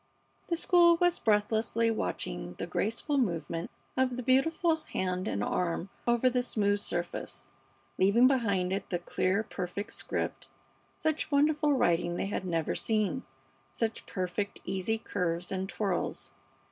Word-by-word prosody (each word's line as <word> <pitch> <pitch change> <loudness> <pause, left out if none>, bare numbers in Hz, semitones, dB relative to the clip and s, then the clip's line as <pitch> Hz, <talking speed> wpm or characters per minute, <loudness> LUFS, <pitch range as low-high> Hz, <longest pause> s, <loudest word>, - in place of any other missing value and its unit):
The 335 - 0
school 340 -1 +5
was 350 0 +2
breathlessly 220 +1 +2
watching 75 - -3
the - - -4
graceful 230 - -1
movement 170 -6 -1 0.3
of 255 -1 +1
the 250 - -3
beautiful 320 +6 +3
hand 185 -9 -3
and 100 - -1
arm 175 - -1 0.2
over 240 +1 +4
the 250 0 +2
smooth 205 -4 +1
surface, 175 -3 -3 0.5
leaving 200 +6 +5
behind 200 -9 +2
it 195 - -3
the 175 - 0
clear, 185 +4 0
perfect 200 +1 -5
script. - - -3 0.5
Such 315 0 -1
wonderful 295 +1 +3
writing 175 -8 +2
they - - -1
had 195 -1 -3
never 165 -3 0
seen; 215 -5 0 0.5
such 225 -1 -2
perfect, 185 +2 -3
easy 195 +4 -1
curves 180 -5 -2
and 190 0 -2
twirls. 195 -4 -2
210 Hz, 135 wpm, -30 LUFS, 180-255 Hz, 0.5 s, school